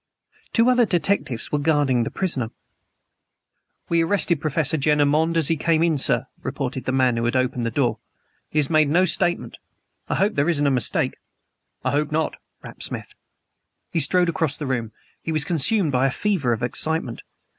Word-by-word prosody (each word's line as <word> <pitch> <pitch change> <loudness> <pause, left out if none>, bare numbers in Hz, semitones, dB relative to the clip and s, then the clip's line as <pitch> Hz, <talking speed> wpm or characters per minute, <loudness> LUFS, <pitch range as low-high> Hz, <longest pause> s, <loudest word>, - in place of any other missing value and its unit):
Two 230 +1 +3
other 250 -2 +4
detectives 175 - -1
were 150 - +1
guarding 145 -5 +2
the - - -3
prisoner. 135 -12 -2 1.4
"We 170 0 +2
arrested 170 -3 +1
Professor 155 0 0
Jenner 150 0 +2
Monde 160 +3 +1
as 160 -4 +2
he 165 - +2
came 165 +1 +1
in, 160 -4 +1
sir," - - +1 0.2
reported - - -4
the - - -1
man 130 -2 +2
who 115 - -1
had 120 - 0
opened 125 -2 0
the - - 0
door. - - 0 0.5
"He - - -5
has 150 -2 +3
made 155 -1 +3
no 175 +5 +4
statement. 175 0 -1 0.5
I - - 0
hope 205 +2 +1
there 145 +4 +1
isn't 145 -4 +1
a 140 - +3
mistake." 125 -4 0 0.7
"I - - +1
hope 150 +1 0
not," 160 +1 -1 0.3
rapped - - -11
Smith. - - -5 0.8
He 165 - 0
strode 175 +4 +4
across 160 -3 -1
the 150 - -5
room. 120 -4 -2 0.3
He 165 - -4
was 155 -2 0
consumed 170 +1 +2
by 130 +1 +2
a - - +1
fever 165 -4 0
of 115 +1 -2
excitement. 130 0 -2
150 Hz, 185 wpm, -22 LUFS, 130-170 Hz, 1.4 s, other